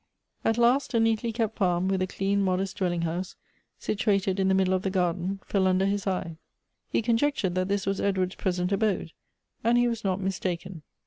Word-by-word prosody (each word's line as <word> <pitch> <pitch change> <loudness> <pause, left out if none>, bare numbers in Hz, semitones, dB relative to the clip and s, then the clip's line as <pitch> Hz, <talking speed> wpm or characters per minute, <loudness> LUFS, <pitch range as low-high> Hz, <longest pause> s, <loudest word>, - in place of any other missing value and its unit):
At 225 - +1
last 245 +2 +3
a - - +4
neatly 225 +1 +1
kept 225 -1 -2
farm, 180 -1 +2
with 190 -1 0
a 185 - +1
clean, 195 +2 0
modest 190 0 -1
dwell 185 -2 +1
ing 170 -1 -2
house, 175 +3 -3 0.4
situated 200 -2 0
in 190 - +2
the 190 - +3
middle 190 -1 +2
of 185 - +1
the 195 - -1
garden, 185 +1 -1
fell 190 -2 +1
under 185 +1 +2
his 200 +1 -1
eye. 180 -4 -2 0.5
He - - 0
conjectured 235 -4 +1
that 185 0 0
this 200 0 -1
was 195 0 -1
Edward's 190 -2 0
present 180 -1 -1
abode; 200 -5 0 0.5
and 235 +2 +4
he 245 0 +4
was 230 -2 -3
not 190 -1 0
mistaken. 185 -2 -3
195 Hz, 200 wpm, -27 LUFS, 185-210 Hz, 0.5 s, a